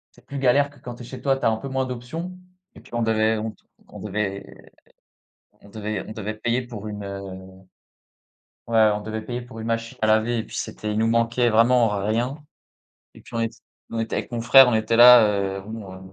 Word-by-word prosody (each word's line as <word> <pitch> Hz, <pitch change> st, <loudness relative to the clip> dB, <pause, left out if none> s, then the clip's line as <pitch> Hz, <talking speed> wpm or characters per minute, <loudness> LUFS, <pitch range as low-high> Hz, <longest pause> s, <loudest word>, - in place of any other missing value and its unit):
c'est -, -, -22 dB
plus 140 Hz, -, -6 dB
galère 140 Hz, +2 st, +3 dB
que 140 Hz, -2 st, -20 dB
quand 125 Hz, 0 st, -8 dB
tu 120 Hz, -, -13 dB
es -, -, -8 dB
chez 130 Hz, 0 st, -9 dB
toi, 135 Hz, -1 st, +3 dB
tu -, -, -11 dB
as -, -, +5 dB
un 110 Hz, -, 0 dB
peu 135 Hz, -, -7 dB
moins 130 Hz, 0 st, -1 dB
d'options 130 Hz, +9 st, -6 dB, 0.4 s
et -, -, -13 dB
puis -, -, -19 dB
on 120 Hz, -, -1 dB
devait 110 Hz, 0 st, +2 dB
on 110 Hz, +1 st, -3 dB
te -, -, -26 dB, 0.2 s
on -, -, -12 dB
devait 100 Hz, -1 st, -3 dB, 1.2 s
on 100 Hz, -, -16 dB
devait 105 Hz, -1 st, -4 dB
on 110 Hz, -, -7 dB
devait 110 Hz, 0 st, -4 dB
payer 120 Hz, +3 st, -1 dB
pour 110 Hz, -4 st, -8 dB
une, 105 Hz, -1 st, -6 dB
heu 100 Hz, 0 st, -6 dB, 1.5 s
ouais, 110 Hz, -2 st, +4 dB
on 105 Hz, -, -3 dB
devait 110 Hz, +1 st, -5 dB
payer 120 Hz, +2 st, -5 dB
pour 120 Hz, -2 st, -11 dB
une 110 Hz, -, -6 dB
machine 115 Hz, 0 st, -3 dB
à -, -, +3 dB
laver 110 Hz, +2 st, +2 dB
et -, -, -3 dB
puis -, -, -11 dB
c'était 105 Hz, -, -4 dB
il 105 Hz, -, -1 dB
nous 115 Hz, -, +2 dB
manquait 115 Hz, +1 st, +2 dB
vraiment 115 Hz, +1 st, +4 dB, 0.2 s
rien 120 Hz, +6 st, -1 dB, 0.8 s
et -, -, -14 dB
puis 125 Hz, -, -17 dB
on 115 Hz, -, -1 dB
ét 115 Hz, -1 st, -1 dB, 0.4 s
on 115 Hz, -, -5 dB
était 115 Hz, -, -2 dB
avec -, -, -5 dB
mon 120 Hz, -, -3 dB
frère, 130 Hz, +3 st, +8 dB
on 120 Hz, -, +2 dB
était 110 Hz, +1 st, +1 dB
là, 120 Hz, -2 st, +9 dB
heu, 95 Hz, 0 st, -3 dB
bon, 110 Hz, -3 st, -8 dB
heu, -, -, -11 dB
115 Hz, 235 wpm, -23 LUFS, 110-125 Hz, 1.5 s, là